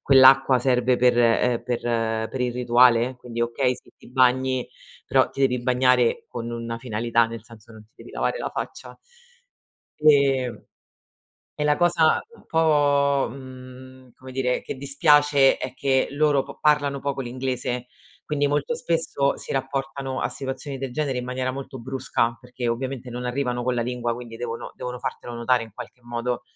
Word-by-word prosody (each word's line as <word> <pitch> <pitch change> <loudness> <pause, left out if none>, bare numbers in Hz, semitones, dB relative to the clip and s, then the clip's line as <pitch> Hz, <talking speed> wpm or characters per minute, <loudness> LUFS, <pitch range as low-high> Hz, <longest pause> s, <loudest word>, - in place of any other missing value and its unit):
quell'acqua 135 -1 +6
serve 125 0 +2
per, 125 -1 +3
ehm, 120 0 +3
per 120 -1 -2 0.5
per 130 - -5
il 125 -1 0
rituale, 125 0 +4
quindi 120 -1 -7
okay, 125 +2 0
sì - - -17
ti - - -17
bagni, 130 0 +2 0.4
però - - +3
ti 135 - -9
devi 125 -2 +2
bagnare 125 -1 +2
con 120 -1 -6
una 115 0 -5
finalità, 115 0 +1
nel 115 -1 -8
senso 115 0 -15
non 110 -1 -13
ti 110 - -33
devi - - -13
lavare - - -1
la - - -3
faccia. - - -6 1.0
Ehm, 140 -5 +3 0.9
e 150 - -3
la 150 0 +3
cosa, 170 -2 +3 0.2
uhm, - - -17
un - - -24
po', 145 -3 +2
mhmm, 130 0 -12
come 130 0 -11
dire 125 -1 0
che - - -5
dispiace 145 0 +4
è 130 0 -5
che 135 0 +1
loro 145 -1 +2
p - - -12
parlano 145 -2 +2
poco 140 -1 -3
l'inglese, 125 -1 -3 0.4
quindi 145 -1 0
molto 145 +11 0
spesso 165 -8 0
si - - -6
rapportano 135 0 -3
a - - 0
situazioni 135 +1 -5
del 135 -1 -5
genere 140 -2 -1
in 125 - -4
maniera 130 +1 -2
molto 135 0 -7
brusca, 120 -2 -1
perché 125 -1 -5
ovviamente 130 +1 -3
non 125 +1 -5
arrivano 125 -1 -1
con 125 0 0
la 120 - 0
lingua, 120 -1 -2
quindi 120 -1 -9
devono 115 -1 -6
devono 125 -1 -6
fartelo 120 -1 -6
notare 120 +1 +1
in 110 - -11
qualche 125 - -10
modo. 120 0 -3
130 Hz, 170 wpm, -24 LUFS, 120-135 Hz, 1.0 s, quell'acqua